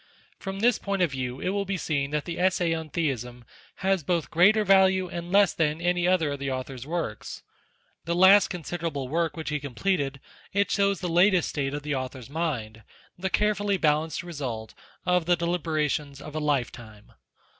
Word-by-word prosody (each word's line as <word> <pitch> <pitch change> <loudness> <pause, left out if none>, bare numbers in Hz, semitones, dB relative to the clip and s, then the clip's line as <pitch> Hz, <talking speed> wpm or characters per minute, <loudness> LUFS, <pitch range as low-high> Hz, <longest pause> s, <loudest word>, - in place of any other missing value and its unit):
From 195 +1 -5
this 240 0 +3
point 200 -2 0
of 170 - +1
view 130 -1 -4
it - - -2
will 200 +1 0
be 195 -1 -3
seen 140 -5 -1
that 150 0 -2
the 170 -1 -5
Essay 180 -2 +2
on 160 -1 -4
Theism 125 -6 -3 0.4
has 195 -2 +2
both 170 +1 -1
greater 200 +6 +5
value 190 -1 +4
and 175 -1 -6
less 200 -2 +5
than 155 -1 0
any 175 +1 +1
other 175 -5 +2
of 140 - -4
the 140 0 -3
Author's 130 0 -5
works. 160 -10 -4 0.6
The 170 +1 -1
last 190 +3 +7
consider 175 -1 -4
able 140 -5 -4
work 165 +4 -1
which 160 - -4
he 150 0 -1
completed, 140 0 -1 0.3
it 200 +1 +1
shows 200 -2 +1
the 180 - -2
latest 175 +2 +3
state 140 -1 -2
of 145 - -5
the 150 0 -2
Author's 130 -1 -5
mind, 125 -9 -3 0.3
the 190 +2 -3
carefully 205 +1 +1
balanced 155 0 +1
result 130 -10 -5 0.3
of 180 -2 +2
the 175 - +5
deliberations 155 -4 -1
of 150 - -9
a 155 - -2
lifetime. 120 -7 -3
165 Hz, 185 wpm, -26 LUFS, 140-185 Hz, 0.6 s, last